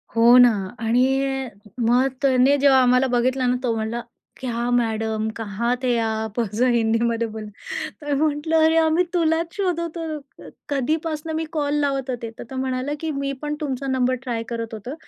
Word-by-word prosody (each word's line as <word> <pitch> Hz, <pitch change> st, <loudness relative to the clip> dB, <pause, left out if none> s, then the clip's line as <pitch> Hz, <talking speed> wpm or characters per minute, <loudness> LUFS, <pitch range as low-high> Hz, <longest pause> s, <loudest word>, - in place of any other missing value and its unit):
हो 235 Hz, +2 st, +7 dB
ना 245 Hz, -1 st, +8 dB, 0.3 s
आणि 235 Hz, +2 st, +2 dB, 0.8 s
मग 250 Hz, +3 st, +4 dB
त्याने 265 Hz, 0 st, +4 dB
जेव्हा 270 Hz, -2 st, +5 dB
आम्हाला 250 Hz, +1 st, +4 dB
बघितला 255 Hz, +1 st, +1 dB
ना, 250 Hz, 0 st, +2 dB
तो 235 Hz, -2 st, +1 dB
म्हणला 225 Hz, +2 st, -3 dB, 0.4 s
क्या 240 Hz, -2 st, -2 dB
मॅडम 220 Hz, -2 st, 0 dB
कहाँ 225 Hz, +2 st, -1 dB
थे 245 Hz, -2 st, +2 dB
आप. 220 Hz, 0 st, -2 dB
असं 225 Hz, +2 st, 0 dB
हिंदीमध्ये 230 Hz, 0 st, +1 dB
बोलला, 215 Hz, -1 st, -7 dB, 0.5 s
तर 295 Hz, -1 st, -2 dB
म्हटलं, 305 Hz, +2 st, 0 dB
"अरे, 320 Hz, 0 st, +3 dB
आम्ही 325 Hz, +2 st, +3 dB
तुलाच 330 Hz, 0 st, +1 dB
शोधत 340 Hz, -4 st, -2 dB
होतो, 310 Hz, -4 st, -7 dB, 0.2 s
कधीपासनं 310 Hz, +3 st, -1 dB
मी 320 Hz, -, -1 dB
कॉल 290 Hz, -2 st, -1 dB
लावत 275 Hz, -2 st, -1 dB
होते." 235 Hz, -2 st, -3 dB
तर -, -, -5 dB
तो 265 Hz, -, -7 dB
म्हणाला 260 Hz, +1 st, -2 dB
की 320 Hz, -, -3 dB
"मी 275 Hz, -1 st, -2 dB
पण 300 Hz, 0 st, -2 dB
तुमचा 275 Hz, -2 st, -3 dB
नंबर 255 Hz, -1 st, +1 dB
ट्राय 235 Hz, -3 st, -3 dB
करत 230 Hz, -1 st, -4 dB
होतो, 220 Hz, +5 st, -6 dB
255 Hz, 165 wpm, -22 LUFS, 235-295 Hz, 0.8 s, ना